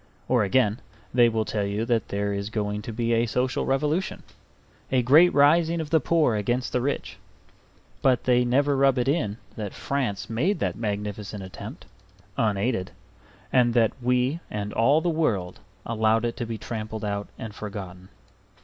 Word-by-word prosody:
Or 125 Hz, -4 st, +3 dB
again, 105 Hz, +1 st, +2 dB, 0.3 s
they 120 Hz, -1 st, +5 dB
will 110 Hz, -1 st, -1 dB
tell 105 Hz, -1 st, -1 dB
you 100 Hz, +3 st, -2 dB
that 115 Hz, -3 st, 0 dB
there 100 Hz, 0 st, -2 dB
is 100 Hz, +1 st, -3 dB
going 105 Hz, -1 st, -2 dB
to 115 Hz, -, -6 dB
be 115 Hz, +1 st, 0 dB
a 115 Hz, +1 st, +2 dB
social 125 Hz, +3 st, -1 dB
revolution, 150 Hz, +7 st, 0 dB, 0.7 s
a 130 Hz, -2 st, +3 dB
great 155 Hz, +8 st, +6 dB
rising 165 Hz, +4 st, +4 dB
of 155 Hz, -2 st, -5 dB
the 160 Hz, -, +5 dB
poor 155 Hz, -4 st, +2 dB
against 120 Hz, +5 st, -1 dB
the 125 Hz, -, +1 dB
rich; 140 Hz, +3 st, -3 dB, 0.8 s
but 130 Hz, -3 st, +3 dB
they 125 Hz, -1 st, +3 dB
never 140 Hz, +4 st, +2 dB
rub 135 Hz, -1 st, +3 dB
it 125 Hz, +1 st, 0 dB
in 125 Hz, -8 st, 0 dB, 0.2 s
that 105 Hz, -3 st, -5 dB
France 130 Hz, -8 st, -2 dB
made 150 Hz, -, 0 dB
that -, -, -1 dB
magnificent 105 Hz, -1 st, -4 dB
attempt, 95 Hz, -, -9 dB, 0.5 s
unaided, 105 Hz, -2 st, 0 dB, 0.6 s
and 120 Hz, -2 st, +4 dB
that 115 Hz, -2 st, +4 dB
we 125 Hz, +5 st, +1 dB
and 105 Hz, 0 st, -4 dB
all 140 Hz, +8 st, +4 dB
the 175 Hz, -, -2 dB
world 115 Hz, -, -1 dB, 0.3 s
allowed 110 Hz, 0 st, +1 dB
it 115 Hz, -, -2 dB
to 120 Hz, -, -3 dB
be 115 Hz, -1 st, -4 dB
trampled 110 Hz, -1 st, -5 dB
out 100 Hz, 0 st, -3 dB
and 110 Hz, -2 st, -7 dB
forgotten. 95 Hz, -3 st, -8 dB
115 Hz, 165 wpm, -25 LUFS, 105-130 Hz, 0.8 s, great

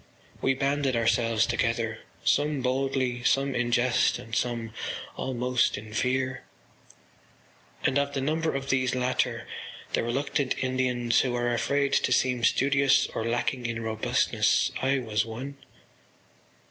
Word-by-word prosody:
We 135 Hz, -, +2 dB
banded 140 Hz, -1 st, 0 dB
ourselves 115 Hz, -1 st, +2 dB
together, -, -, -1 dB, 0.3 s
some 145 Hz, -2 st, +2 dB
boldly, 130 Hz, -1 st, 0 dB
some 135 Hz, +2 st, +2 dB
in 120 Hz, -1 st, -1 dB
jest 120 Hz, +1 st, +3 dB
and 115 Hz, -, -12 dB
some 115 Hz, -2 st, -2 dB, 0.4 s
almost 125 Hz, -2 st, 0 dB
in 105 Hz, +1 st, -9 dB
fear: 130 Hz, +2 st, -1 dB, 1.4 s
and 140 Hz, -, +2 dB
of 140 Hz, 0 st, -2 dB
the -, -, 0 dB
number 160 Hz, +2 st, 0 dB
of 135 Hz, 0 st, -2 dB
these 130 Hz, -1 st, +1 dB
latter, 125 Hz, 0 st, 0 dB, 0.5 s
the -, -, +2 dB
reluctant 135 Hz, +3 st, -1 dB
Indians 125 Hz, -2 st, +1 dB
who 125 Hz, -2 st, 0 dB
were 120 Hz, 0 st, 0 dB
afraid 140 Hz, +3 st, +1 dB
to -, -, +2 dB
seem 125 Hz, -2 st, +2 dB
studious 135 Hz, +2 st, +3 dB
or -, -, -2 dB
lacking 120 Hz, +1 st, -1 dB
in 115 Hz, -1 st, -3 dB
robustness, 110 Hz, -1 st, +1 dB
I 135 Hz, +1 st, +2 dB
was 110 Hz, -5 st, 0 dB
one. 125 Hz, +6 st, -7 dB
125 Hz, 135 wpm, -27 LUFS, 120-135 Hz, 1.4 s, jest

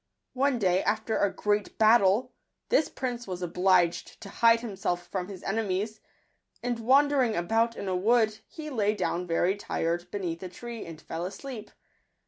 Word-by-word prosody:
One 265 Hz, 0 st, +2 dB
day, 185 Hz, -4 st, +2 dB
after 220 Hz, +1 st, 0 dB
a 200 Hz, -, +2 dB
great 205 Hz, 0 st, -1 dB
battle, 220 Hz, +2 st, +4 dB, 0.4 s
this 395 Hz, -10 st, +3 dB
prince 245 Hz, -3 st, -4 dB
was 180 Hz, -1 st, -5 dB
obliged 180 Hz, 0 st, +1 dB
to 200 Hz, -, -8 dB
hide 230 Hz, +2 st, +4 dB
himself 190 Hz, -6 st, -3 dB
from 180 Hz, -1 st, -4 dB
his 195 Hz, -2 st, -9 dB
enemies; 215 Hz, +1 st, -2 dB, 0.6 s
and 240 Hz, -1 st, -1 dB
wandering 265 Hz, -1 st, +3 dB
about 225 Hz, +6 st, +1 dB
in 200 Hz, -, -5 dB
a 185 Hz, -, 0 dB
wood, 220 Hz, +2 st, +2 dB
he 305 Hz, -1 st, -8 dB
lay 210 Hz, -4 st, +1 dB
down 180 Hz, -2 st, -2 dB
very 175 Hz, +3 st, +2 dB
tired 175 Hz, -3 st, -2 dB
beneath 175 Hz, -5 st, -4 dB
a 185 Hz, -, -6 dB
tree, 235 Hz, +3 st, -8 dB
and 165 Hz, -2 st, -9 dB
fell 165 Hz, +1 st, -5 dB
asleep. 215 Hz, +5 st, -7 dB
205 Hz, 160 wpm, -28 LUFS, 180-235 Hz, 0.6 s, battle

